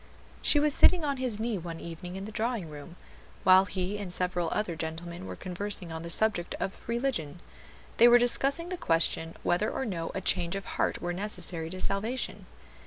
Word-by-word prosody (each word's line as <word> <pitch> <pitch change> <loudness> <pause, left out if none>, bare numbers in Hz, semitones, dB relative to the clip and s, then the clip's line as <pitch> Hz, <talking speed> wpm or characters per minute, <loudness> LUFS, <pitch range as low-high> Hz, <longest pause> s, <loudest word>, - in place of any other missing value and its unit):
She 295 - +4
was 295 0 +3
sitting 345 +1 +5
on 280 -2 -1
his 250 -5 -2
knee 225 -3 -1
one 165 -1 -6
evening 175 +2 -7
in 195 +1 -5
the 215 - -7
drawing 220 -6 -2
room, 150 +3 -10 0.5
while 185 +1 +7
he 195 +1 -3
and 195 -3 -5
several 180 -2 0
other 210 -5 -1
gentlemen 170 +3 -6
were - - -6
conversing 185 -1 -4
on 160 0 -5
the 170 - -6
subject 205 -1 +2
of 195 - -4
religion. 235 - -1 0.6
They 235 - +8
were 240 0 +8
discussing 275 +7 +2
the 365 - -3
question 165 - +1
whether 180 +5 +1
or 265 - -3
no 170 -7 -3
a - - 0
change 175 -1 +1
of 195 - -4
heart - - -1
were 175 0 -1
necessary 175 -4 -2
to 185 +2 -7
salvation. 220 +6 -2
190 Hz, 190 wpm, -29 LUFS, 170-230 Hz, 0.6 s, They